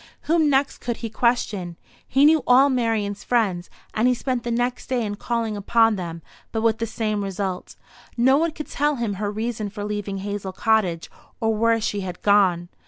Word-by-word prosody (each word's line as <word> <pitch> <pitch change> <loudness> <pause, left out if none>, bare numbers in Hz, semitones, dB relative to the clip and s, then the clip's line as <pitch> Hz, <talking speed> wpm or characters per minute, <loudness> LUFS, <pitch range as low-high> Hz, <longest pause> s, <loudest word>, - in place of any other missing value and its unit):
Whom 320 -1 +2
next 275 0 +1
could 240 -1 -3
he 225 - -5
question? 210 -7 0 0.3
He 275 +2 +4
knew 310 0 +5
all 265 +3 +6
Marian's 225 -5 -1
friends, 195 -8 0 0.2
and 220 +3 +2
he 250 - +3
spent 255 0 -2
the 240 - -5
next 245 +1 -1
day 250 -3 0
in 205 - -3
calling 225 +1 -2
upon 225 +2 +3
them, 170 -3 -6 0.3
but 220 -1 -2
with 225 -1 +2
the 230 - -1
same 215 -2 -2
result; 190 -1 -4 0.4
no 260 +3 +5
one 330 +4 +2
could 305 -1 -7
tell 295 +1 0
him 230 -5 -2
her 205 - 0
reason 215 0 -3
for 205 0 -7
leaving 205 -1 -3
Hazel 200 -1 -4
Cottage, 190 -6 0 0.3
or 225 -2 +1
where 230 +1 +2
she 210 -1 -2
had 180 -2 -7
gone. 185 -4 +3
220 Hz, 190 wpm, -23 LUFS, 200-245 Hz, 0.4 s, all